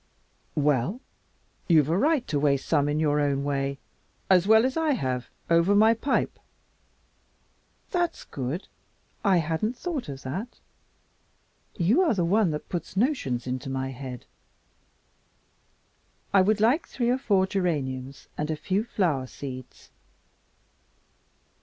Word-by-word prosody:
"Well, 150 - +1 0.7
you've 155 -5 +5
a 165 - +2
right 285 - +2
to 145 - 0
waste 140 -2 +1
some 145 -2 +2
in 150 +1 0
your 145 -2 +2
way 140 0 -1 0.5
as 185 0 +5
well 220 +2 +6
as 260 - -1
I 320 -2 +2
have 130 - -2 0.2
over 170 +4 +4
my 220 +2 +6
pipe." 250 +5 -1 1.5
"That's 350 -2 -1
good. 140 +7 -5 0.6
I 195 -3 +4
hadn't 165 +9 -1
thought 315 - -4
of 135 -1 -7
that. 195 - -5 1.2
You 200 - +3
are 330 - +3
the 175 -3 +1
one 200 +2 +3
that 150 -1 -4
puts 175 +1 -5
notions 195 - 0
into 130 +1 -4
my 135 0 -2
head. 130 -2 -8 2.1
I 195 - +7
would 210 +3 +2
like 245 +10 +3
three 240 -2 0
or 255 - +1
four 195 -6 +2
geraniums 140 -9 -3
and 150 +1 -1
a 155 - 0
few 190 +7 -1
flower 165 - 0
seeds." 130 -1 -9
170 Hz, 130 wpm, -26 LUFS, 140-220 Hz, 2.1 s, I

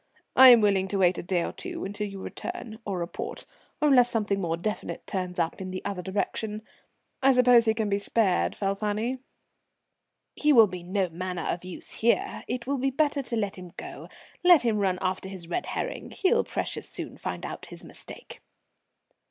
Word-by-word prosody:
"I 260 0 +10
am 240 -2 +8
willing 195 -2 +2
to 200 - -2
wait 180 -1 +3
a - - -2
day 175 -1 0
or - - -3
two - - -4
until 205 +2 -3
you 195 -1 -8
return 235 - -6
or 195 -2 -2
report, 170 0 -5 0.3
or 300 - +3
unless 250 -4 +6
something 205 -4 0
more 165 -2 -1
definite 210 +5 -4
turns 185 -3 -3
up 170 +2 -1
in 185 - -5
the 185 0 -6
other 195 -3 -3
direction. 210 +3 -3 0.6
I 270 0 +5
suppose 250 -2 +6
he 220 0 +2
can 220 -2 -1
be 200 0 +1
spared, 200 -3 +1
Falfani?" 210 +5 -1 1.2
"He 300 0 +3
will 230 -4 +9
be 180 -3 -6
no 185 +2 -1
manner 180 +1 -4
of 175 - -2
use 185 -1 -7
here, 235 +1 +1
it 245 0 -3
will 275 +1 -1
be 270 +2 +1
better 285 +1 +1
to 245 -3 -4
let 205 -4 -2
him 180 -1 -11
go; - - -8 0.4
let 355 -6 +7
him 225 -3 +1
run 190 -2 +1
after 190 +1 -2
his 185 -3 -7
red 355 - -3
herring, - - -4
he'll 465 +4 +2
precious - - -4
soon - - -6
find - - -5
out - - -7
his - - -11
mistake." 485 - -11
205 Hz, 195 wpm, -27 LUFS, 185-245 Hz, 1.2 s, I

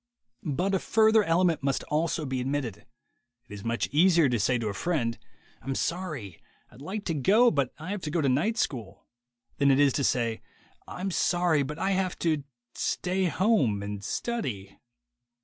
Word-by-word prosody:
But 175 +7 -1
a 190 - +2
further 220 +1 +4
element 170 -1 +2
must 140 -1 -1
also 155 +1 -1
be 130 -2 -2
admitted. 130 -5 -3 0.6
It 105 - -11
is 100 -1 -8
much 115 0 -1
easier 165 -1 +4
to 120 -2 0
say 125 +5 +2
to 115 -2 -3
a 105 - -2
friend: 120 - -1 0.4
"I'm 135 0 -3
sorry; 155 - -4 0.3
I'd 130 - -15
like 200 +7 -5
to 165 - -1
go. 210 - +4
But 140 -5 0
I 160 +5 -6
have 205 -2 -3
to 155 - -4
go 165 - 0
to 145 - +1
night 160 - +1
school," 110 - -3 0.5
than 140 - +3
it 135 0 +4
is 140 -2 +4
to 140 - 0
say, 115 -3 0 0.5
"I'm 190 +2 -4
sorry; 175 -3 +2
but 150 +3 -4
I 190 +4 0
have 190 -1 0
to 155 -4 +1 0.2
— 120 0 -59
stay 185 +1 -1
home 165 - +2
and 100 0 -5
study." 110 - -4
150 Hz, 185 wpm, -27 LUFS, 125-185 Hz, 0.6 s, further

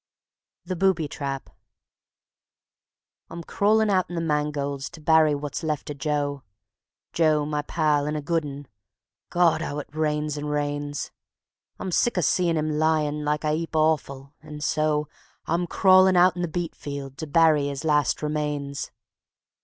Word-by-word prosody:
The 185 +1 -3
Booby 180 -3 +2
Trap 140 -2 -5 1.8
I'm 170 - -7
crawlin' 215 +4 +2
out 185 -2 +1
in 175 - -6
the - - -1
mangolds 150 -3 -2
to 170 - -10
bury 155 -1 +4
wot's 145 +1 -5
left 150 -2 -3
o' - - -3
Joe 145 0 -2 0.7
Joe, 155 -3 +2
my 150 0 -1
pal, 150 -1 0
and 150 0 -2
a - - -3
good 165 +1 0
un 145 -1 -8 0.6
(God! 175 -2 +3
'ow 145 -2 -4
it 145 -1 -7
rains 150 -1 -1
and 145 0 -4
rains). 145 0 -3 0.7
I'm 185 - -5
sick 235 +4 +1
o' - - +3
seein' 170 +1 +2
him 155 0 -1
lyin' 155 -1 +1
like 150 +1 -1
a 150 0 +1
'eap 165 +1 -3
o' 155 0 +5
offal, 140 -2 -9
and 150 -1 -8
so 155 -1 +1 0.4
I'm 170 +2 0
crawlin' 185 +1 +5
out 180 0 +5
in 175 - -4
the 175 - 0
beet 170 +1 -3
field 140 -2 -7
to 160 - -4
bury 155 -2 +4
'is 140 +2 -5
last 150 -1 +1
remains. 150 -2 -3
150 Hz, 160 wpm, -25 LUFS, 145-165 Hz, 1.8 s, o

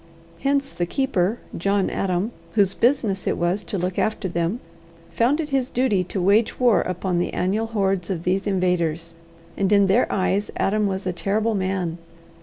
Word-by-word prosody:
Hence 275 +3 0
the 175 - -2
keeper, 225 -5 0 0.2
John 200 +2 +1
Adam, 190 +3 -1 0.2
whose 200 -3 +3
business 225 -6 +1
it - - +1
was 175 +4 0
to 200 - -3
look 180 0 -2
after 215 -2 0
them, 170 +5 -1 0.5
found 255 +7 +2
it 305 -2 -2
his 265 -2 +1
duty 235 -7 +1
to 190 - -4
wage 205 +5 +2
war 245 -4 +4
upon 180 0 -2
the 175 - -2
annual 205 +5 0
hordes 195 -5 -1
of 175 -4 -3
these 190 +3 0
invaders; 175 -4 0 0.4
and 195 0 0
in 200 -1 +5
their 195 +6 +2
eyes 195 +2 0
Adam 210 +1 +1
was 190 0 -3
a 180 - -1
terrible 210 +5 0
man. 185 -4 -2
195 Hz, 175 wpm, -23 LUFS, 180-220 Hz, 0.5 s, in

